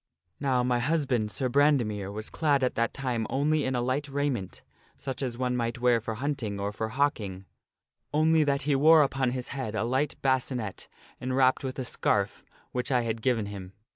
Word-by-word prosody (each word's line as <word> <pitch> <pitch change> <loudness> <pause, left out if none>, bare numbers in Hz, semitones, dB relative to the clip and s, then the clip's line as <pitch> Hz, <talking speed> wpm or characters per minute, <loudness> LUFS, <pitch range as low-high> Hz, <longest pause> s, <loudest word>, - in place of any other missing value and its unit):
" - - -48
Now, 130 -3 +1
my 125 -1 +1
husband, 130 -5 0
Sir 130 +4 -1
Brandemere, 120 -8 +2
was 110 +1 -6
clad 145 -4 +2
at 125 - +1
that 115 0 0
time 120 -5 -2
only 150 +2 +1
in 130 0 -1
a 120 - +1
light 130 +4 -1
raiment 135 -8 -2 0.3
such 135 -1 -5
as 125 -3 -3
one 125 0 0
might 115 -1 -1
wear 120 -1 +3
for 110 0 -4
hunting 120 -5 -3
or 100 +1 -2
for 110 +1 -3
hawking; 110 -8 -1 0.7
only 155 +1 +4
that 140 -1 0
he 145 0 +2
wore 155 +3 +7
upon 135 -2 0
his 125 0 -4
head 130 -6 -4
a 110 - 0
light 130 +5 0
bascinet 130 -6 -1 0.3
enwrapped 130 +1 +2
with 130 -1 -4
a 130 - -3
scarf - - 0 0.3
which 125 +3 -3
I 125 -2 +3
had 115 -1 -3
given 115 -3 +1
him. 100 -2 -8
125 Hz, 195 wpm, -28 LUFS, 115-140 Hz, 0.7 s, wore